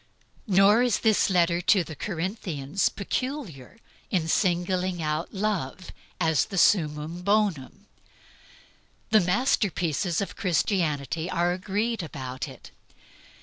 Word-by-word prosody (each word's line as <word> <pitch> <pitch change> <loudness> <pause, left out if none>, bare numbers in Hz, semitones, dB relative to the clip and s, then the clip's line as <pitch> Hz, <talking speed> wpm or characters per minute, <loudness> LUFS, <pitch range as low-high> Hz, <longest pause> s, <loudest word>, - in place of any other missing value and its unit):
Nor 200 +3 +5
is 245 -2 +2
this 220 -3 +3
letter 175 -2 +2
to 185 0 +3
the 160 - -9
Corinthians 175 -3 -2
peculiar 210 - -5 0.3
in 175 -5 0
singling 180 +1 0
out 155 +1 -2
love 190 -5 -3 0.3
as 160 -2 +2
the 195 - -6
summum 160 -2 +2
bonum. 200 -8 0 1.3
The 220 - +7
masterpieces 180 - 0
of 200 - -4
Christianity 165 - -1
are 175 -1 +1
agreed 205 +4 -2
about 130 -5 -6
it. - - -13
180 Hz, 105 wpm, -26 LUFS, 160-200 Hz, 1.3 s, The